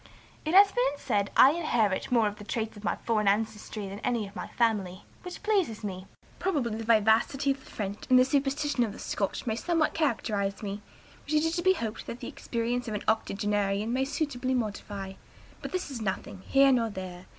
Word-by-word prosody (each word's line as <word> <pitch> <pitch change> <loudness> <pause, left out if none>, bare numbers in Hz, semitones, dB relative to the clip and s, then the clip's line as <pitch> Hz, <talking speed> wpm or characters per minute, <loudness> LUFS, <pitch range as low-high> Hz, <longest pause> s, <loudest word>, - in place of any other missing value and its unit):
"It 315 +4 0
has 400 0 +8
been 270 +4 +1
said 205 -8 0
I 270 - +9
inherit 240 - 0
more 235 -3 +4
of 205 0 -4
the - - -8
traits 225 0 -3
of 205 - -12
my 175 - 0
foreign 215 -3 +1
ancestry 210 0 -1
than 195 +1 -7
any 235 -3 -1
of 195 - -15
my - - -5
family, 205 -6 0 0.2
which 360 +2 -8
pleases 385 - +1
me. 185 -2 -5 0.3
Probably 275 - 0
the 225 - -4
vivacity 230 +5 +3
of 270 -1 -4
the - - -16
French 205 -1 -5
and 255 - +7
the 255 - +6
superstition 275 0 +1
of 215 -3 -2
the - - -10
Scotch 200 - -3
may 220 -2 0
somewhat 330 +5 +1
characterize 215 -9 -1
me, 200 0 -4 0.4
which 305 - -1
it 300 - +4
is 325 +1 0
to - - 0
be 375 +2 +5
hop'd 225 - -5
the 235 - -6
experience 240 +1 -3
of 215 - -3
an 205 - -4
octogenarian 205 0 0
may 265 +1 +1
suitably 260 -3 -1
modify. 205 -4 -4 0.5
But - - -6
this 370 -5 -3
is 245 -4 -5
nothing, 190 -2 -4
here 275 0 +5
nor 235 -3 +2
there. 185 -2 -8
230 Hz, 205 wpm, -28 LUFS, 205-275 Hz, 0.5 s, I